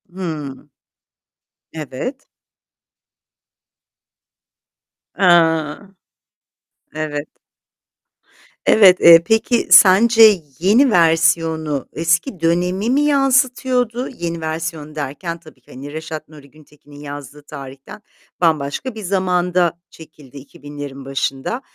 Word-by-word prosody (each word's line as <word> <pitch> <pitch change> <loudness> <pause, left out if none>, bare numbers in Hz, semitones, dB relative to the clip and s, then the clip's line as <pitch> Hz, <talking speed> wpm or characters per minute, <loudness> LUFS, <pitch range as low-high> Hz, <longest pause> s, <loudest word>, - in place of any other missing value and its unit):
Hımm. 150 -6 -7 1.0
Evet. 160 - -7 2.9
A, 165 0 +1 1.0
Evet. 150 -1 -5 1.4
Evet, 190 -4 +5
eee, 170 0 +8
peki 225 +3 0
sence 215 0 +6 0.2
yeni 225 - +3
versiyonu, 160 - +1
eski 170 - -1
dönemi 180 +5 -1
mi 270 +3 +2
yansıtıyordu? 260 -3 0
Yeni 170 -8 -6
versiyon 160 -1 -5
derken 155 +4 -6
tabii 155 -5 -19
ki, - - -21
hani 140 +3 -10
Reşat 155 -1 -8
Nuri 145 -3 -16
Güntekin'in 145 -1 -19
yazdığı 145 0 -10
tarihten 135 +3 -11 0.4
bambaşka 160 - -1
bir 215 - -8
zamanda 180 -2 0
çekildi. 150 -4 -16
2000'lerin 140 0 -10
başında. 135 - -4
165 Hz, 85 wpm, -18 LUFS, 150-195 Hz, 2.9 s, eee